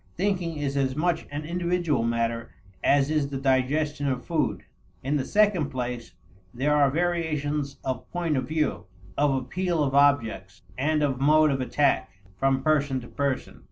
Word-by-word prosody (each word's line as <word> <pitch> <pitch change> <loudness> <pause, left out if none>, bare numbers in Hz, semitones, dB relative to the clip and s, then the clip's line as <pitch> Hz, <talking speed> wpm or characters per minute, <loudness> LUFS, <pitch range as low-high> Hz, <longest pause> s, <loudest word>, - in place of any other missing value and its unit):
Thinking 180 -4 -1
is 140 -1 -2
as 130 -1 0
much 170 +2 0
an 145 +1 -5
individual 170 -4 0
matter 115 0 -1 0.3
as 140 +1 +3
is 150 -3 +1
the 140 - -4
digestion 140 +2 +1
of 130 -2 -2
food. 150 - -1 0.4
In 140 +3 0
the 135 - -1
second 200 -5 +2
place, 125 -3 -5 0.4
there 140 +6 +1
are 145 -2 +4
variations 150 -3 -1
of 130 -2 -4
point 170 -3 -1
of 130 - -1
view, 150 - -1 0.3
of 145 -1 +2
appeal 175 +4 -1
of 135 -2 -1
objects, 130 -10 +2
and 150 +3 +1
of 135 -2 -1
mode 155 +1 +5
of 135 -1 -1
attack, 140 +3 +1 0.3
from 135 0 +1
person 145 -3 +2
to 120 - -11
person. 140 -1 -3
145 Hz, 160 wpm, -26 LUFS, 130-155 Hz, 0.4 s, mode